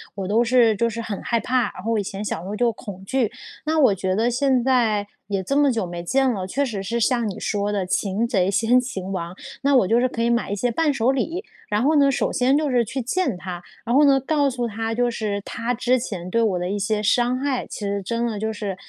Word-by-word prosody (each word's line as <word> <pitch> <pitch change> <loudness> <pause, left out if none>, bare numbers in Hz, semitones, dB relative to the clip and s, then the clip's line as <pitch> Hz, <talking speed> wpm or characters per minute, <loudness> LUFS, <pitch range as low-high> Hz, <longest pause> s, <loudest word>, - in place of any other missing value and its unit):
我 195 -2 -4
都 220 +4 +3
是 235 -2 +4
就 235 +3 +1
是 230 +1 -5
很 215 -3 -5
害 235 - 0
怕， 250 +3 0
然 185 - -10
后 225 0 0
以 205 - 0
前 195 +1 -5
小 185 - -3
时 180 - -8
候 205 - -4
就 235 +1 +2
恐 200 -5 -9
惧， 240 0 0 0.3
那 315 +1 +1
我 250 -9 +5
觉 185 0 -1
得 225 +4 +2
现 255 0 +2
在 225 -6 +2 0.2
也 195 -2 -2
这 275 - -1
么 285 -2 +4
久 225 -5 -1
没 175 0 -6
见 265 +8 +2
了， 190 -5 -3
确 280 +8 0
实 215 -7 -4
是 235 +5 -2
像 235 -1 +1
你 190 - -6
说 205 0 -1
的 195 -3 -1
擒 200 +4 0
贼 195 -5 +1
先 225 +5 +3
擒 195 -7 -5
王， 175 -1 -4 0.3
那 280 0 +3
我 220 -8 +4
就 230 +2 +3
是 255 - +3
可 230 - -4
以 235 - +2
买 235 -3 +1
一 - - 0
些 245 +5 0
伴 305 +3 +1
手 250 0 +2
礼， 325 - -2 0.2
然 210 +1 +1
后 305 +3 +3
呢， 280 -1 +5
首 - - 0
先 265 +2 +3
就 300 -1 0
是 245 -2 +3
去 230 +5 -4
见 260 - -1
她， 180 -1 -6 0.2
然 240 +3 +1
后 295 - +6
呢， 275 -1 +5
告 285 +1 +1
诉 245 -2 -2
她 225 +1 -3
就 245 +1 +1
是 210 -3 -2
她 235 +2 -2
之 250 +2 +2
前 185 -7 -5
对 230 +5 +1
我 195 -6 +1
的 180 - -2
一 205 - -1
些 210 +1 0
伤 240 +4 +2
害 265 -2 -1
其 - - -8
实 200 0 -1
真 235 +5 -1
的 225 -3 -2
就 220 +1 -1
是， 205 -3 -4
230 Hz, 285 characters per minute, -23 LUFS, 200-255 Hz, 0.3 s, 后